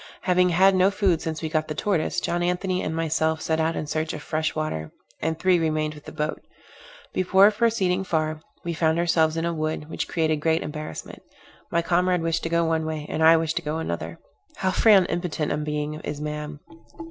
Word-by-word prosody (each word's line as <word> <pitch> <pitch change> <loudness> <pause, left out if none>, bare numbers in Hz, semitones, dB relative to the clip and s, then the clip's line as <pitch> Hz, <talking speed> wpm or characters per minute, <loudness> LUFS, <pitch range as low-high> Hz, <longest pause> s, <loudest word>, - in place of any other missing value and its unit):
Having 180 0 +3
had 190 +3 +5
no 185 +1 +4
food 195 -5 +1
since 160 0 -4
we 160 - -1
got 155 0 0
the 155 - -4
tortoise, 180 -2 0
John 175 0 -1
Anthony 180 +1 0
and 160 - -3
myself 160 0 0
set 160 0 -1
out 160 +1 +1
in - - -3
search 155 +1 -2
of 150 - -7
fresh 155 0 -1
water, 115 - -3 0.3
and 160 0 -1
three 185 0 +3
remained 155 -1 0
with 150 -1 -14
the - - -8
boat. 150 -1 -3 0.7
Before 190 +3 +5
proceeding 205 -5 +1
far, 155 -3 -1 0.2
we 170 - -2
found 160 0 +1
ourselves 165 -2 +2
in 165 - -1
a 170 - -1
wood, 155 -1 -3
which - - -3
created 160 -2 0
great 160 +2 +1
embarrassment. 150 +1 -7 0.5
My 170 0 +1
comrade 180 0 +1
wished 165 0 0
to 165 - -3
go 170 0 +2
one 160 0 +1
way, 155 -1 -4
and 160 - -2
I 165 +1 +8
wished 160 0 -1
to - - 0
go 155 0 -3
another. 85 - -4 0.4
How 190 -1 0
frail 215 +1 +6
and 180 - -2
impotent 170 -3 -2
a 150 - 0
being 150 0 -2
is 150 -1 -5
man! 150 0 -5
160 Hz, 210 wpm, -24 LUFS, 155-175 Hz, 0.7 s, I